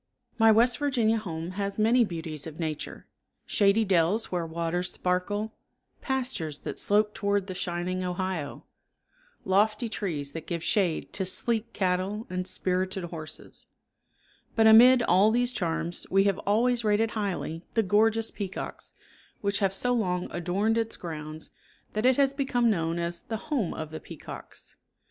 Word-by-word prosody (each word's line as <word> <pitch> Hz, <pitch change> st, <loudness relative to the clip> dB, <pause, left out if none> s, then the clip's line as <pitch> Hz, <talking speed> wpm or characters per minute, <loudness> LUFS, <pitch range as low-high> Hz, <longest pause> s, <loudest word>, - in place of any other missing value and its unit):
My 225 Hz, 0 st, +7 dB
West 235 Hz, +4 st, +4 dB
Virginia 240 Hz, -6 st, +2 dB
home 165 Hz, -4 st, -5 dB
has 200 Hz, +1 st, -3 dB
many 230 Hz, +3 st, +4 dB
beauties 165 Hz, -6 st, -4 dB
of 160 Hz, 0 st, -10 dB
nature, 155 Hz, -3 st, -4 dB, 0.4 s
shady 205 Hz, +2 st, +3 dB
dells 185 Hz, +3 st, +2 dB
where 175 Hz, -2 st, -1 dB
waters 170 Hz, +2 st, -2 dB
sparkle, 205 Hz, +4 st, -1 dB, 0.5 s
pastures 250 Hz, -, -1 dB
that -, -, -5 dB
slope 210 Hz, +1 st, +3 dB
toward 200 Hz, -1 st, 0 dB
the 190 Hz, -, -6 dB
shining 180 Hz, +1 st, -2 dB
Ohio, 180 Hz, -4 st, -3 dB, 0.8 s
lofty 210 Hz, +4 st, +2 dB
trees 160 Hz, -10 st, -3 dB
that 160 Hz, +1 st, -8 dB
give 170 Hz, -2 st, -3 dB
shade 180 Hz, -6 st, 0 dB
to 195 Hz, -, -1 dB
sleek 225 Hz, +4 st, 0 dB
cattle 190 Hz, +3 st, -1 dB
and 185 Hz, 0 st, -2 dB
spirited 185 Hz, 0 st, 0 dB
horses; 160 Hz, -2 st, -8 dB, 0.9 s
but 225 Hz, -, +4 dB
amid 240 Hz, +3 st, +8 dB
all 195 Hz, +1 st, +5 dB
these 245 Hz, +2 st, +1 dB
charms 170 Hz, -2 st, -2 dB
we 195 Hz, +1 st, +4 dB
have 200 Hz, -2 st, +1 dB
always 235 Hz, +3 st, +2 dB
rated 215 Hz, +1 st, +2 dB
highly 185 Hz, -6 st, -3 dB
the 225 Hz, -, +3 dB
gorgeous 220 Hz, +3 st, +2 dB
peacocks 195 Hz, -3 st, -6 dB, 0.5 s
which 200 Hz, 0 st, 0 dB
have 195 Hz, -2 st, +2 dB
so 245 Hz, +6 st, 0 dB
long 180 Hz, -6 st, 0 dB
adorned 195 Hz, +6 st, 0 dB
its 225 Hz, 0 st, -3 dB
grounds 155 Hz, -2 st, -7 dB, 0.4 s
that 215 Hz, +4 st, +1 dB
it 255 Hz, -, +4 dB
has 275 Hz, -1 st, +3 dB
become 250 Hz, -4 st, +1 dB
known 165 Hz, -3 st, -1 dB
as 170 Hz, 0 st, -3 dB
the 225 Hz, -, -4 dB
"Home 250 Hz, -, -2 dB
of 155 Hz, -1 st, -6 dB
the 155 Hz, -, -6 dB
Peacocks." -, -, -10 dB
195 Hz, 150 wpm, -27 LUFS, 175-225 Hz, 0.9 s, amid